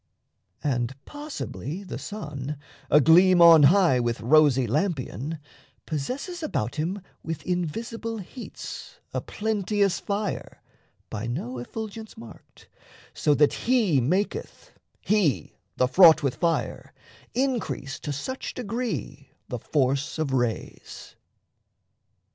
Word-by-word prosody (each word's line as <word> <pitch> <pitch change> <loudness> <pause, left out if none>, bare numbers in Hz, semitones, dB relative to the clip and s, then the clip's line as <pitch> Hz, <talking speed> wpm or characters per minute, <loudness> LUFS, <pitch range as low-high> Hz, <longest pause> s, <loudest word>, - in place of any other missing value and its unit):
And 125 -2 -1
possibly 280 - -6
the 185 - -6
sun, 150 -8 -6 0.3
Agleam 175 +5 +6
on 165 -2 +9
high 165 -3 +5
with 120 -1 -1
rosy 135 0 +4
lampion, 140 - -2 0.5
Possesses 260 - -4
about 120 - -2
him 180 +5 -2 0.2
with 165 -2 -5
invisible 225 +6 -3
heats 245 - -9
A - - -1
plenteous 205 -2 0
fire, 205 0 -4 0.5
by 110 +1 -4
no 120 +1 -4
effulgence 220 - -7
marked, 115 - -14 0.5
So 150 - +2
that 150 0 +4
he 220 - +2
maketh, 185 - -2 0.3
he, 195 - +1 0.2
the 125 - +3
Fraught 160 +3 +7
with 135 -3 +1
fire, 165 +6 -2 0.4
Increase 240 - -1
to 150 - -4
such 260 - -5
degree 245 +1 -4 0.2
the - - -3
force 140 0 0
of 155 -4 -1
rays. 120 -3 -3
165 Hz, 105 wpm, -26 LUFS, 135-210 Hz, 0.5 s, on